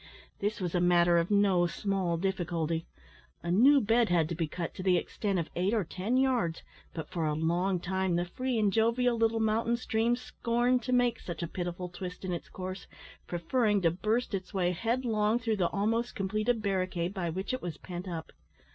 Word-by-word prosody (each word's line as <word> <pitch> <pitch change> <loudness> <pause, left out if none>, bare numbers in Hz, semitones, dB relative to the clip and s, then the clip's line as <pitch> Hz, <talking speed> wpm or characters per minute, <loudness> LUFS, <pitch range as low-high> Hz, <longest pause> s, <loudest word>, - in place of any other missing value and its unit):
This 205 +2 -1
was 180 -3 -2
a 180 - +2
matter 175 -1 +5
of 170 - -1
no 200 -4 +4
small 190 -2 -1
difficulty. 170 -3 -1 0.6
A 170 - -2
new 265 +10 +6
bed 230 0 +3
had 170 -3 +3
to - - -2
be 165 -1 -1
cut 170 +2 -5
to - - -7
the 185 -1 +3
extent 200 +1 -2
of 165 -2 -2
eight 190 +6 +1
or 215 - +1
ten 190 +9 -1
yards, 250 -11 +1 0.3
but 160 - -6
for 170 -4 -2
a 150 - 0
long 175 +4 +1
time 190 0 -1
the 175 +1 +1
free 255 +7 -2
and 205 -3 +2
jovial 235 +2 +2
little 225 0 +2
mountain 225 +2 +1
stream 235 0 +1
scorned 245 0 0
to 255 - -4
make 245 -2 +2
such 175 -1 -6
a - - -2
pitiful 175 +1 -4
twist 180 +1 -7
in 180 - -2
its 170 - -6
course, 185 0 -6 0.4
preferring 205 +5 +1
to 165 - +4
burst 215 +7 -1
its 190 0 -4
way 180 -2 +2
headlong 225 +1 +1
through 225 -3 -1
the 175 -3 +2
almost 225 +4 0
completed 215 +4 0
barricade, 185 -2 -1
by 180 -4 -2
which 190 +8 -3
it 255 - -2
was 170 -3 -5
pent 180 +1 -7
up. 165 -3 -5
190 Hz, 200 wpm, -30 LUFS, 175-225 Hz, 0.6 s, new